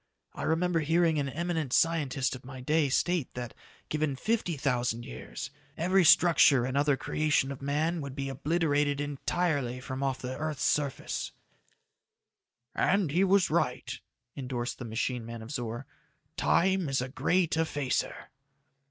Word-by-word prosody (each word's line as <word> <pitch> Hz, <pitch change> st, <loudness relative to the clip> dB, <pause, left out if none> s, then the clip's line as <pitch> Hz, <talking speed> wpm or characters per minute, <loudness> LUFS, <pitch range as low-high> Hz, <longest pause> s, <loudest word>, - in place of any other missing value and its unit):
"I -, -, -7 dB
remember 165 Hz, +2 st, +1 dB
hearing 165 Hz, 0 st, +2 dB
an 140 Hz, -1 st, -1 dB
eminent 160 Hz, -2 st, -2 dB
scientist 145 Hz, -6 st, +1 dB
of 130 Hz, -, -11 dB
my 130 Hz, 0 st, -9 dB
day 150 Hz, +3 st, +1 dB
state 175 Hz, +2 st, +1 dB
that, 120 Hz, -2 st, -5 dB, 0.3 s
given 155 Hz, -2 st, -1 dB
fifty 185 Hz, -, -1 dB
thousand 125 Hz, -3 st, -1 dB
years, 60 Hz, -, -7 dB, 0.3 s
every 185 Hz, +3 st, +3 dB
structure 155 Hz, -6 st, +6 dB
and 130 Hz, +1 st, -3 dB
other 145 Hz, -1 st, +3 dB
creation 150 Hz, -2 st, +1 dB
of 135 Hz, -, -7 dB
man 155 Hz, +4 st, 0 dB
would 140 Hz, -2 st, -6 dB
be 135 Hz, -1 st, -3 dB
obliterated 145 Hz, 0 st, 0 dB
entirely 145 Hz, -2 st, -1 dB
from 130 Hz, +1 st, -5 dB
off 135 Hz, -1 st, 0 dB
the 130 Hz, 0 st, -5 dB
earth's 155 Hz, -1 st, -3 dB
surface." 145 Hz, -3 st, -1 dB, 1.4 s
"And 185 Hz, -5 st, +2 dB
he 175 Hz, +5 st, +3 dB
was 195 Hz, -2 st, +3 dB
right," 130 Hz, -5 st, -1 dB, 0.4 s
endorsed 125 Hz, -2 st, -4 dB
the 120 Hz, -, -5 dB
machine 115 Hz, +2 st, -2 dB
man 115 Hz, 0 st, -7 dB
of 115 Hz, -, -9 dB
Zor. 120 Hz, -2 st, -4 dB, 0.5 s
"Time 190 Hz, -3 st, +2 dB
is 135 Hz, -, +1 dB
a -, -, -4 dB
great 175 Hz, +5 st, +1 dB
effacer." 145 Hz, -4 st, -1 dB
145 Hz, 145 wpm, -29 LUFS, 130-165 Hz, 1.4 s, structure